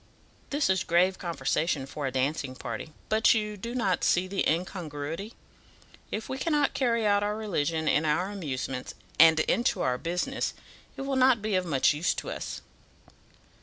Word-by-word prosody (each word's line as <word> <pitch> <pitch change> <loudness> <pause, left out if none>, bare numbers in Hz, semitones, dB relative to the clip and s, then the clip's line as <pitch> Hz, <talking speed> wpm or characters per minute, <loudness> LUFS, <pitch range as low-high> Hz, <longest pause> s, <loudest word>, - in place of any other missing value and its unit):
This 290 +1 +1
is 190 -1 +2
grave 180 +3 +2
conversation 160 -3 -1
for 140 +1 -4
a - - -2
dancing 135 0 -1
party; 115 +5 -6 0.2
but 220 +2 +4
you 210 -1 -1
do 230 +5 -6
not 195 -7 0
see 175 +1 +3
the 195 +1 -1
incongruity. 165 +2 -3 0.7
If 215 - -4
we 265 - -4
cannot 295 -2 +1
carry 235 -4 +1
our 205 0 +2
religion 165 -7 -1
into 150 +1 +2
our 180 +6 0
amusements, 135 -8 -4 0.2
and 160 0 +8
into 235 +9 +1
our 125 0 0
business, 175 +2 -2 0.4
it - - -5
will 275 -1 -1
not 255 -4 +4
be 215 -1 -1
of 185 -1 +1
much 140 -2 +3
use 155 +4 0
to - - -5
us." - - -5
180 Hz, 165 wpm, -28 LUFS, 150-215 Hz, 0.7 s, and